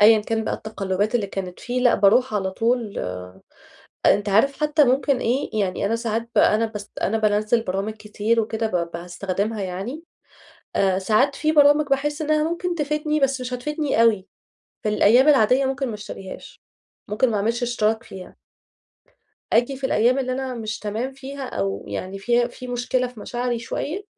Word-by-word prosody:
أيًا 220 Hz, +1 st, +8 dB
كان 220 Hz, +1 st, -2 dB
بقى -, -, -1 dB
التقلبات 205 Hz, 0 st, -2 dB
اللي 215 Hz, -4 st, +1 dB
كانت 190 Hz, -2 st, -6 dB
فيه، 250 Hz, +1 st, -2 dB
لأ 245 Hz, -2 st, +4 dB
باروح 220 Hz, +4 st, +3 dB
على 190 Hz, -2 st, 0 dB
طول، 230 Hz, +1 st, -1 dB, 1.1 s
أنت 205 Hz, +1 st, +3 dB
عارف 270 Hz, +8 st, +2 dB
حتى 300 Hz, 0 st, +4 dB
ممكن 265 Hz, +1 st, +2 dB
إيه، 250 Hz, +4 st, -1 dB
يعني 195 Hz, 0 st, -1 dB
أنا 225 Hz, +3 st, +1 dB
ساعات 230 Hz, 0 st, -2 dB
بقى -, -, +5 dB
أنا 225 Hz, +2 st, +2 dB
باس 210 Hz, -2 st, -8 dB
أنا 225 Hz, +3 st, +1 dB
بانزِّل 215 Hz, +2 st, +2 dB
برامج 195 Hz, +1 st, -2 dB
كتير 215 Hz, +1 st, -1 dB
وكده 220 Hz, 0 st, -2 dB
ب 175 Hz, -5 st, -1 dB
باستخدمها، 195 Hz, +5 st, -3 dB
يعني 195 Hz, -, -5 dB, 0.7 s
آآ 190 Hz, -1 st, +2 dB
ساعات 225 Hz, +8 st, +2 dB
في 310 Hz, -1 st, +1 dB
برامج 290 Hz, 0 st, +5 dB
باحس 290 Hz, +2 st, 0 dB
إنها 305 Hz, 0 st, +2 dB
ممكن 350 Hz, +1 st, -2 dB
تفيدني 300 Hz, -1 st, -1 dB
بس 270 Hz, -1 st, +1 dB
مش 250 Hz, 0 st, -4 dB
هتفيدني 290 Hz, -1 st, 0 dB
أوي 210 Hz, -4 st, +3 dB, 0.6 s
في 215 Hz, -, -1 dB
الأيام 235 Hz, +6 st, +5 dB
العادية، 265 Hz, -1 st, +5 dB
ممكن 270 Hz, 0 st, -1 dB
ما 220 Hz, -, -4 dB
اشتريهاش، 195 Hz, -2 st, -9 dB, 0.5 s
ممكن 215 Hz, +5 st, +1 dB
ما 215 Hz, -, 0 dB
اعملش 230 Hz, +4 st, 0 dB
اشتراك 225 Hz, -2 st, 0 dB
فيها 185 Hz, -1 st, -11 dB, 1.2 s
آجي 245 Hz, +4 st, +2 dB
في 270 Hz, -, -9 dB
الأيام 245 Hz, +2 st, +3 dB
اللي 255 Hz, -1 st, -1 dB
أنا 260 Hz, -1 st, -3 dB
مش 220 Hz, -2 st, -4 dB
تمام 220 Hz, +5 st, -3 dB
فيها، 275 Hz, +1 st, -8 dB
أو 100 Hz, 0 st, -3 dB
يعني 185 Hz, -, -5 dB
في 240 Hz, +4 st, +2 dB
في 250 Hz, +1 st, -10 dB
مشكلة 245 Hz, +1 st, 0 dB
في 245 Hz, -4 st, -11 dB
مشاعري 245 Hz, 0 st, -2 dB
شوية، 315 Hz, -, -4 dB
230 Hz, 170 wpm, -23 LUFS, 210-265 Hz, 1.2 s, أيًا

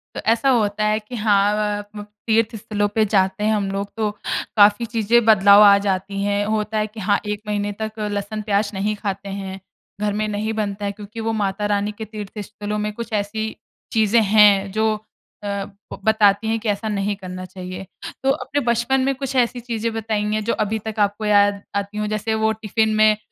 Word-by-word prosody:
तो -, -, -4 dB
ऐसा 230 Hz, +4 st, +2 dB
होता 215 Hz, -4 st, +2 dB
है 215 Hz, 0 st, +2 dB
कि 220 Hz, +3 st, -9 dB
हाँ 205 Hz, -2 st, +3 dB
अ 210 Hz, -, -1 dB, 0.2 s
आप 205 Hz, 0 st, -8 dB
लोग 205 Hz, 0 st, -7 dB, 0.2 s
तीर्थ 225 Hz, 0 st, +2 dB
स्थलों 205 Hz, -1 st, -1 dB
पे 220 Hz, -, +4 dB
जाते 195 Hz, 0 st, +1 dB
हैं 215 Hz, -, +2 dB
हम 200 Hz, -2 st, 0 dB
लोग 200 Hz, +1 st, -3 dB
तो 215 Hz, -1 st, +1 dB, 0.5 s
काफ़ी 205 Hz, +2 st, +5 dB
चीज़ें 230 Hz, +1 st, +2 dB
बदलाव 205 Hz, -2 st, +7 dB
आ 200 Hz, -1 st, +8 dB
जाती 195 Hz, 0 st, -2 dB
हैं, 205 Hz, 0 st, 0 dB
होता 215 Hz, 0 st, -1 dB
है 215 Hz, 0 st, 0 dB
कि 220 Hz, +1 st, -11 dB
हाँ 205 Hz, 0 st, +2 dB
1 210 Hz, 0 st, -3 dB
महीने 205 Hz, 0 st, -1 dB
तक 220 Hz, -, -2 dB
लहसुन-प्याज़ 205 Hz, 0 st, -1 dB
नहीं 205 Hz, +2 st, -1 dB
खाते 200 Hz, -1 st, -4 dB
हैं। 190 Hz, 0 st, -6 dB, 0.4 s
घर 210 Hz, -1 st, 0 dB
में 215 Hz, +1 st, -1 dB
नहीं 215 Hz, +1 st, -2 dB
बनता 205 Hz, -1 st, -3 dB
है 200 Hz, -, -1 dB
क्योंकि 210 Hz, +2 st, -10 dB
वो 225 Hz, 0 st, -1 dB
माता 205 Hz, -1 st, -1 dB
रानी 205 Hz, 0 st, 0 dB
के 220 Hz, -, -5 dB
तीर्थ 210 Hz, 0 st, -8 dB
स्थलों 210 Hz, +1 st, -5 dB
में 210 Hz, 0 st, -2 dB
कुछ 230 Hz, +2 st, -7 dB
ऐसी 215 Hz, +1 st, -2 dB, 0.4 s
चीज़ें 220 Hz, +1 st, +4 dB
हैं 205 Hz, -2 st, +5 dB
जो 220 Hz, +1 st, +1 dB, 0.5 s
अ, -, -, -4 dB
ब 200 Hz, 0 st, -6 dB
बताती 215 Hz, -1 st, +4 dB
हैं 225 Hz, 0 st, 0 dB
कि 220 Hz, -, -3 dB
ऐसा 205 Hz, +2 st, -1 dB
नहीं 205 Hz, 0 st, -1 dB
करना 185 Hz, -1 st, -7 dB
चाहिए। 185 Hz, +1 st, -8 dB, 0.4 s
तो 270 Hz, -, +2 dB
अपने 290 Hz, +1 st, -2 dB
बचपन 235 Hz, +2 st, +1 dB
में 270 Hz, +1 st, +1 dB
कुछ 270 Hz, 0 st, -5 dB
ऐसी 245 Hz, -1 st, +2 dB
चीज़ें 230 Hz, -1 st, -3 dB
बताएँगे 215 Hz, -1 st, -1 dB
जो 225 Hz, +2 st, -1 dB
अभी 220 Hz, +1 st, -2 dB
तक 215 Hz, 0 st, -4 dB
आपको 205 Hz, +1 st, +1 dB
याद 205 Hz, -1 st, +3 dB
आती 200 Hz, +1 st, -3 dB
हो 210 Hz, 0 st, -1 dB
जैसे 215 Hz, +1 st, -1 dB
वो 220 Hz, -, +4 dB
टिफ़िन 220 Hz, 0 st, 0 dB
में 215 Hz, 0 st, +5 dB
210 Hz, 205 wpm, -21 LUFS, 200-220 Hz, 0.5 s, आ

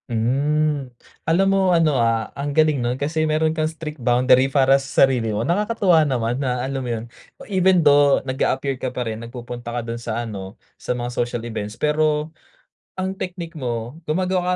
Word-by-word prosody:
Hmm, 140 Hz, +4 st, 0 dB, 0.4 s
alam 175 Hz, +4 st, +3 dB
mo 190 Hz, -1 st, +3 dB
ano 160 Hz, -3 st, +3 dB
ah, 115 Hz, -1 st, 0 dB
ang 140 Hz, +1 st, -4 dB
galing 155 Hz, -4 st, +3 dB
nun 120 Hz, +1 st, -1 dB
kasi 155 Hz, +3 st, -1 dB
meron 155 Hz, +1 st, +1 dB
kang 155 Hz, -1 st, 0 dB
strict 155 Hz, -3 st, -8 dB
boundary 125 Hz, +2 st, +4 dB
para 135 Hz, 0 st, +4 dB
sa 135 Hz, 0 st, +4 dB
sarili 125 Hz, -4 st, -1 dB
mo, 105 Hz, +2 st, -1 dB
nakakatuwa 195 Hz, -2 st, +2 dB
naman, 120 Hz, -1 st, -1 dB
na 125 Hz, -2 st, -1 dB
alam 135 Hz, 0 st, -3 dB
mo 125 Hz, -, -4 dB
'yon. 115 Hz, -1 st, -3 dB, 0.4 s
Even 185 Hz, -4 st, +3 dB
though 145 Hz, -1 st, +6 dB
nag-a-appear 130 Hz, 0 st, -1 dB
ka 130 Hz, -, -1 dB
pa 125 Hz, 0 st, -4 dB
rin, 110 Hz, 0 st, -4 dB
nagpupunta 120 Hz, 0 st, -7 dB
ka 120 Hz, 0 st, -2 dB
do'n 115 Hz, 0 st, -5 dB
sa 120 Hz, 0 st, -3 dB
ano, 100 Hz, -2 st, -7 dB, 0.2 s
sa 125 Hz, -, -3 dB
mga 120 Hz, 0 st, -3 dB
social 120 Hz, -1 st, -2 dB
events 110 Hz, -1 st, -5 dB
pero, 150 Hz, 0 st, 0 dB, 0.6 s
ang 190 Hz, 0 st, -3 dB
technique 175 Hz, -2 st, -6 dB
mo 120 Hz, -1 st, -4 dB
gumagawa 180 Hz, +3 st, 0 dB
135 Hz, 175 wpm, -21 LUFS, 120-155 Hz, 0.6 s, though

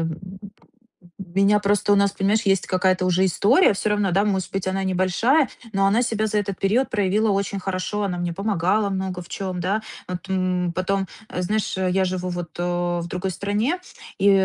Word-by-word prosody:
м 165 Hz, -1 st, -3 dB, 1.0 s
меня 195 Hz, +3 st, +2 dB
просто 205 Hz, 0 st, +2 dB
у -, -, +5 dB
нас, 200 Hz, 0 st, +3 dB
понимаешь, 210 Hz, +3 st, +1 dB
есть 195 Hz, -2 st, +2 dB
какая-то 185 Hz, 0 st, +1 dB
уже 185 Hz, +1 st, +3 dB
история 215 Hz, -, +4 dB
всё 210 Hz, -, -1 dB
равно, 205 Hz, -2 st, +1 dB
да, 200 Hz, +3 st, +3 dB
может 190 Hz, -3 st, -1 dB
быть, 195 Hz, -1 st, -2 dB
она 190 Hz, +1 st, -1 dB
небольшая, 190 Hz, -, +2 dB, 0.2 s
но 195 Hz, -1 st, +2 dB
она 215 Hz, +5 st, +3 dB
себя 220 Hz, -3 st, 0 dB
за 210 Hz, 0 st, 0 dB
этот 200 Hz, -2 st, -3 dB
период 225 Hz, +7 st, +1 dB
проявила 210 Hz, +1 st, +1 dB
очень 200 Hz, 0 st, -1 dB
хорошо, 190 Hz, +2 st, -2 dB
она 180 Hz, -3 st, -2 dB
мне 175 Hz, -1 st, -2 dB
помогала 200 Hz, +2 st, 0 dB
много 190 Hz, -2 st, -3 dB
в 175 Hz, -, -15 dB
чём, 185 Hz, -2 st, -4 dB
да. 200 Hz, +5 st, 0 dB, 0.3 s
Вот, 180 Hz, +1 st, -6 dB
м, 185 Hz, -2 st, 0 dB
потом, 190 Hz, +2 st, -1 dB, 0.2 s
а, 180 Hz, -, -3 dB
знаешь, 210 Hz, +3 st, -1 dB
э, 185 Hz, -1 st, +1 dB
я 190 Hz, 0 st, +2 dB
живу 185 Hz, 0 st, -2 dB
вот, 175 Hz, -2 st, -6 dB
э, 175 Hz, 0 st, -1 dB
в 170 Hz, -, -5 dB
другой 185 Hz, +2 st, -3 dB
стране, 210 Hz, -, -1 dB, 0.4 s
и, 200 Hz, +1 st, +5 dB
195 Hz, 195 wpm, -23 LUFS, 180-205 Hz, 1.0 s, у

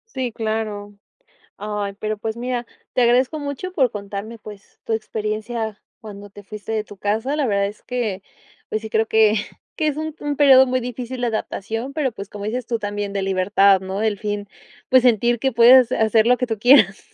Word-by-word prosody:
Sí, 255 Hz, -2 st, -2 dB
claro. 215 Hz, -2 st, -4 dB, 0.6 s
Ay, 205 Hz, -1 st, -4 dB
pero, 215 Hz, +1 st, -4 dB
pues, 220 Hz, +1 st, -4 dB
mira, 245 Hz, 0 st, -3 dB, 0.3 s
te -, -, 0 dB
agradezco 250 Hz, +5 st, +3 dB
mucho 290 Hz, +5 st, -5 dB
por 265 Hz, -9 st, +2 dB
contarme, 205 Hz, +2 st, -7 dB
pues, 210 Hz, -2 st, -13 dB
tu -, -, -3 dB
experiencia 220 Hz, 0 st, -3 dB, 0.2 s
cuando 205 Hz, -2 st, -10 dB
te 205 Hz, +1 st, -13 dB
fuiste 210 Hz, +2 st, -9 dB
de 215 Hz, -1 st, -1 dB
tu 205 Hz, -2 st, -14 dB
casa. 220 Hz, +8 st, -1 dB
La 295 Hz, -3 st, 0 dB
verdad 200 Hz, -3 st, +1 dB
es 205 Hz, +1 st, -9 dB
que 225 Hz, -6 st, -3 dB, 0.5 s
pues 215 Hz, -, -3 dB
sí 220 Hz, -, -7 dB
creo 220 Hz, +1 st, +1 dB
que 220 Hz, -1 st, +4 dB, 0.4 s
que 310 Hz, -, 0 dB
es 295 Hz, -, 0 dB
un 310 Hz, 0 st, -4 dB
un 290 Hz, -1 st, -3 dB
periodo 265 Hz, -2 st, +7 dB
muy 255 Hz, 0 st, 0 dB
difícil 250 Hz, +1 st, -6 dB
de 240 Hz, -, +1 dB
adaptación, 225 Hz, +3 st, -4 dB
pero 280 Hz, -6 st, -1 dB
pues, 200 Hz, -2 st, -8 dB
como 205 Hz, 0 st, -8 dB
dices 235 Hz, +3 st, -3 dB
tú 235 Hz, -1 st, -1 dB
también 205 Hz, -1 st, -4 dB
de 200 Hz, -, -1 dB
libertad, 195 Hz, +1 st, +3 dB
¿no? 190 Hz, +2 st, -4 dB
El 215 Hz, -2 st, 0 dB
fin 205 Hz, -1 st, -4 dB, 0.4 s
pues 255 Hz, -1 st, +6 dB
sentir 240 Hz, 0 st, +3 dB
que 265 Hz, +3 st, 0 dB
puedes 240 Hz, +2 st, +7 dB
hacer 220 Hz, 0 st, +3 dB
lo 250 Hz, +1 st, +5 dB
que 250 Hz, -, -2 dB
tú 225 Hz, -2 st, -3 dB
quieras. 215 Hz, -4 st, +5 dB
220 Hz, 200 wpm, -21 LUFS, 205-250 Hz, 0.6 s, periodo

